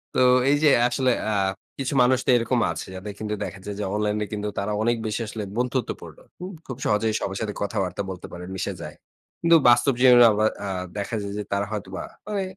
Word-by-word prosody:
তো -, -, +3 dB, 0.3 s
এই 145 Hz, -, +4 dB
যে 150 Hz, -, +6 dB, 0.2 s
আসলে 130 Hz, +1 st, +1 dB, 0.2 s
আ -, -, 0 dB, 0.4 s
কিছু 135 Hz, +1 st, -2 dB
মানুষ 130 Hz, 0 st, +3 dB
তো -, -, -2 dB
এরকম 120 Hz, +1 st, 0 dB
আছে, -, -, -6 dB
যাদের 100 Hz, +2 st, -6 dB
কিন্তু 105 Hz, -1 st, -3 dB
দেখা 100 Hz, -, -8 dB
যায় 105 Hz, -, -5 dB
যে -, -, -2 dB
অনলাইন 105 Hz, 0 st, 0 dB
এ -, -, -2 dB
কিন্তু 105 Hz, 0 st, -3 dB
তারা 100 Hz, +2 st, -2 dB
অনেক 120 Hz, +1 st, +2 dB
বেশি 110 Hz, +2 st, -2 dB
আসলে 110 Hz, -1 st, -5 dB
বন্ধুত্বপূর্ণ। 125 Hz, 0 st, -3 dB, 0.2 s
হুম? 185 Hz, +2 st, -6 dB
খুব 130 Hz, -, -6 dB
সহজেই 110 Hz, +1 st, +1 dB
সবার 95 Hz, 0 st, -3 dB
সাথে 105 Hz, -2 st, -2 dB
কথাবার্তা 100 Hz, -2 st, -2 dB
বলতে 90 Hz, -, -8 dB
পারেন, 90 Hz, 0 st, -8 dB
মিশে 95 Hz, -, -3 dB
যায়। -, -, -8 dB, 0.5 s
কিন্তু 170 Hz, 0 st, +6 dB
বাস্তব 130 Hz, +3 st, +4 dB
জীবনে 125 Hz, -2 st, +8 dB
আবার 110 Hz, +1 st, +2 dB, 0.2 s
আ -, -, -3 dB, 0.3 s
দেখা 100 Hz, +3 st, -3 dB
যায় 100 Hz, 0 st, -5 dB
যে, 105 Hz, -, -2 dB
তারা 100 Hz, 0 st, 0 dB
হয়তোবা 95 Hz, -3 st, -5 dB, 0.2 s
মানে 205 Hz, -2 st, -1 dB
110 Hz, 210 wpm, -24 LUFS, 100-125 Hz, 0.5 s, জীবনে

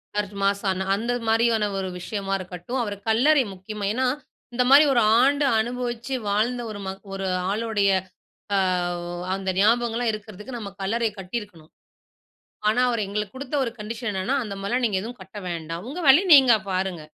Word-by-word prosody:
Search 205 Hz, -1 st, -2 dB
மாஸ்சான 195 Hz, -1 st, 0 dB
அந்த 230 Hz, +4 st, -2 dB, 0.2 s
மாரியான 225 Hz, -1 st, +3 dB
ஒரு 190 Hz, -1 st, -2 dB
விஷயமா 195 Hz, +1 st, -4 dB
இருக்கட்டும் 185 Hz, +7 st, -5 dB
அவர 205 Hz, -2 st, -3 dB, 0.2 s
கல்லறை 270 Hz, +5 st, +4 dB
முக்கியமா 200 Hz, +2 st, -6 dB
ஏன்னா 260 Hz, +2 st, 0 dB, 0.5 s
இந்த 250 Hz, -, +2 dB
மாரி 285 Hz, +3 st, +8 dB
ஒரு 240 Hz, -, +4 dB, 0.2 s
ஆண்டு, 280 Hz, +2 st, +3 dB
அனுபவிச்சு 240 Hz, +2 st, -3 dB
வாழ்ந்த 230 Hz, +4 st, +1 dB
ஒரு 205 Hz, -, -7 dB
ம -, -, -2 dB, 0.2 s
ஒரு 195 Hz, 0 st, -3 dB, 0.2 s
ஆளுடைய 210 Hz, -2 st, +1 dB, 0.6 s
ஆ -, -, +3 dB, 0.5 s
ஒ -, -, -5 dB, 0.2 s
அந்த 195 Hz, 0 st, -4 dB
ஞாபகங்கள்லாம் 235 Hz, +2 st, +2 dB
இருக்கறதுக்கு 215 Hz, +3 st, -8 dB
நம்ம 200 Hz, -2 st, -7 dB
கல்லறை 225 Hz, +3 st, 0 dB
கட்டியிருக்கணும். 185 Hz, -5 st, -7 dB, 1.0 s
ஆனா 245 Hz, +4 st, +2 dB
அவரு 235 Hz, -3 st, 0 dB
எங்களுக்கு 210 Hz, +2 st, -4 dB
குடுத்த 270 Hz, +2 st, -5 dB
ஒரு 230 Hz, -, -3 dB
கண்டிஷன் 225 Hz, +2 st, -4 dB
என்னன்னா 190 Hz, +8 st, -1 dB
அந்த 200 Hz, -2 st, -6 dB
மாரில்லாம் 240 Hz, +5 st, 0 dB
நீங்க 200 Hz, -4 st, 0 dB
எதுவும் 235 Hz, +1 st, -8 dB
கட்ட 190 Hz, +2 st, -11 dB
வேண்டாம். 165 Hz, 0 st, -5 dB
உங்க 310 Hz, +6 st, -6 dB
வேலைய, 310 Hz, +9 st, +7 dB
நீங்க 260 Hz, -4 st, +7 dB, 0.2 s
பாருங்க. 185 Hz, -3 st, -2 dB
215 Hz, 160 wpm, -24 LUFS, 195-240 Hz, 1.0 s, மாரி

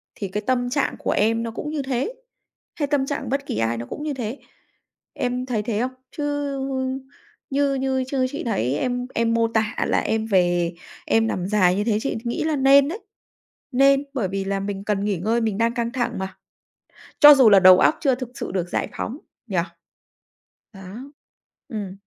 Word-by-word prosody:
thì 200 Hz, -, -4 dB
cái 210 Hz, +3 st, -4 dB
tâm 245 Hz, -1 st, +1 dB
trạng 280 Hz, +2 st, 0 dB
của -, -, -1 dB
em 225 Hz, +2 st, +1 dB
nó 230 Hz, -, -4 dB
cũng 295 Hz, +6 st, -5 dB
như 305 Hz, -1 st, -2 dB
thế, 265 Hz, -, -2 dB, 0.6 s
hay 290 Hz, -, -1 dB
tâm 280 Hz, -2 st, +1 dB
trạng 275 Hz, -3 st, -4 dB
bất 275 Hz, +2 st, -1 dB
kỳ -, -, -4 dB
ai 115 Hz, +1 st, 0 dB
nó 120 Hz, -, -5 dB
cũng 295 Hz, -, -7 dB
như 305 Hz, -1 st, -2 dB
thế. 245 Hz, 0 st, -5 dB, 0.7 s
Em 250 Hz, 0 st, -2 dB
thấy 230 Hz, -5 st, -2 dB
thế 215 Hz, -1 st, -2 dB
không? 255 Hz, +1 st, -1 dB, 0.2 s
Chứ, 295 Hz, -, -5 dB, 0.5 s
ư, 260 Hz, 0 st, -2 dB, 0.5 s
như 280 Hz, 0 st, +1 dB
như 265 Hz, -1 st, 0 dB
chứ 260 Hz, -1 st, 0 dB
chị 290 Hz, -, -5 dB
thấy 135 Hz, -, 0 dB
em 250 Hz, +3 st, -2 dB
em 230 Hz, 0 st, +1 dB
mô 230 Hz, 0 st, +2 dB
tả 220 Hz, -1 st, -1 dB
là -, -, +2 dB
em 220 Hz, 0 st, -1 dB
về 175 Hz, -4 st, +2 dB, 0.3 s
em 225 Hz, 0 st, +2 dB
nằm 185 Hz, -4 st, -2 dB
dài 190 Hz, -3 st, +3 dB
như 205 Hz, -, 0 dB
thế 215 Hz, -1 st, +1 dB
chị 275 Hz, -, -2 dB
nghĩ 235 Hz, -1 st, -2 dB
là 315 Hz, -1 st, 0 dB
nên 275 Hz, 0 st, +5 dB
đấy, 355 Hz, +8 st, -4 dB, 0.7 s
nên 275 Hz, +2 st, +4 dB
bởi 240 Hz, -8 st, -1 dB
vì 195 Hz, +1 st, -3 dB
là 195 Hz, 0 st, -1 dB
mình 195 Hz, 0 st, -4 dB
cần 205 Hz, -1 st, -1 dB
nghỉ 205 Hz, -3 st, 0 dB
ngơi, 220 Hz, +7 st, 0 dB
mình 220 Hz, -3 st, -1 dB
đang 230 Hz, +1 st, +1 dB
căng 235 Hz, -1 st, -2 dB
thẳng 245 Hz, -1 st, -2 dB
mà, 190 Hz, 0 st, -6 dB, 0.8 s
cho 295 Hz, 0 st, +11 dB
dù 260 Hz, -5 st, +6 dB
là 200 Hz, -1 st, +7 dB
đầu 185 Hz, 0 st, +8 dB
óc -, -, +4 dB
chưa 270 Hz, -4 st, +3 dB
thực 255 Hz, -1 st, -6 dB
sự -, -, -5 dB
được 180 Hz, -2 st, -2 dB
giải -, -, -1 dB
phóng 250 Hz, +6 st, -4 dB, 0.3 s
nhỉ? 195 Hz, -, -3 dB, 1.2 s
Đó. 200 Hz, +9 st, -10 dB, 0.6 s
Ừm. 200 Hz, -4 st, -5 dB
230 Hz, 205 wpm, -23 LUFS, 200-265 Hz, 1.2 s, cho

